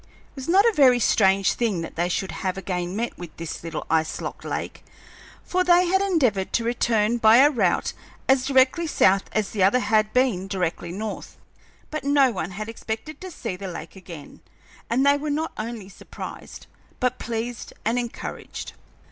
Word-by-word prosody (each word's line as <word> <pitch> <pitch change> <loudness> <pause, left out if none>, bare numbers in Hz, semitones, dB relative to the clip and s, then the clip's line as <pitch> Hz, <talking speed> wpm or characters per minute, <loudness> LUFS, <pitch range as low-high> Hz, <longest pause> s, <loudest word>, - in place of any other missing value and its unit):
It - - -32
was 270 -1 -7
not 390 +4 +5
a 465 - +4
very 265 -7 +6
strange 195 -4 +3
thing 215 -8 -1
that 165 - -7
they 175 +2 0
should 190 +2 -2
have 185 0 -3
again 180 -1 -3
met 235 +3 -3
with 175 -3 -9
this 165 -1 -6
little 165 -2 -5
ice 160 0 0
locked - - -6
lake, - - -5 0.6
for 365 0 0
they 355 0 +5
had 380 +2 +2
endeavored 260 - +1
to 235 - +1
return 230 -1 +1
by 220 +1 +7
a 285 +3 +7
route 200 - +1 0.3
as 265 0 +3
directly 275 +5 +3
south 195 -9 +3
as 215 -2 -1
the 205 - -2
other 195 +6 +5
had 215 -2 +2
been 235 -7 +1
directly 175 -3 -2
north. 210 +4 -6 0.5
But 310 -1 -4
no 280 -2 +4
one 190 - -4
had 210 +3 -6
expected 225 +6 -6
to 375 - -6
see 230 - -5
the 195 +1 -7
lake 170 -2 -8
again, 175 -6 -11 0.5
and 255 +4 +2
they 285 0 +5
were 300 +1 -4
not 310 +3 -1
only 220 -2 -6
surprised, 200 - -10 0.3
but 250 0 0
pleased 235 0 -4
and 230 +3 +1
encouraged. 240 -1 -6
225 Hz, 180 wpm, -24 LUFS, 190-265 Hz, 0.6 s, by